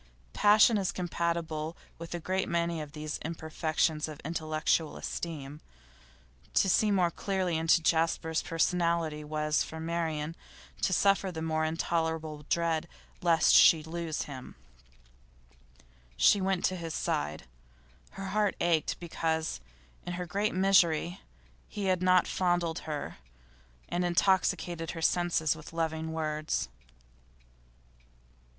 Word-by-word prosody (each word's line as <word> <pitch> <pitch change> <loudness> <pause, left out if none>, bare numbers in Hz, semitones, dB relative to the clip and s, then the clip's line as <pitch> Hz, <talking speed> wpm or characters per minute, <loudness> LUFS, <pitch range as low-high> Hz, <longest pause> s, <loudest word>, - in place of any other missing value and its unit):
Passion 210 +1 +5
is 190 - 0
compatible 170 -2 -2 0.2
with 170 +1 -6
a - - -3
great 185 +3 -1
many 170 -1 0
of 150 -1 -8
these 150 0 -5
imperfections 160 -1 -1
of 155 -2 -8
intellectual 155 0 0
esteem. 150 -3 -6 0.9
To - - +4
see 210 +3 +3
more 185 -4 +2
clearly 185 -2 -1
into 165 +1 +3
Jasper's 160 0 +1
personality 165 -2 0
was, 150 0 0
for 160 - -5
Marian, 160 -1 -2 0.5
to - - +1
suffer 195 +1 +3
the 160 -2 -5
more 160 -1 0
intolerable 160 -2 -2
dread 170 -1 0 0.3
lest 165 -2 +4
she 160 -2 +7
should 160 +1 -10
lose 170 -2 -2
him. 130 -3 -9 1.6
She 195 - +5
went 190 -1 +1
to 185 - +1
his 165 -3 -5
side. 75 0 -2 0.7
Her 195 0 -6
heart 210 +1 +1
ached 170 -3 +1
because, 160 - -2 0.4
in 175 - -5
her 180 0 -4
great 200 +5 -1
misery, 180 -2 +3 0.5
he 205 -2 -5
had 185 -2 +1
not 185 0 +4
fondled 175 -2 0
her, 150 -2 -4 0.7
and 175 +1 -1
intoxicated 175 -2 +1
her - - -5
senses 170 -3 +2
with 155 +1 -11
loving 160 -1 -2
words. 155 - -2
165 Hz, 125 wpm, -30 LUFS, 155-175 Hz, 1.6 s, she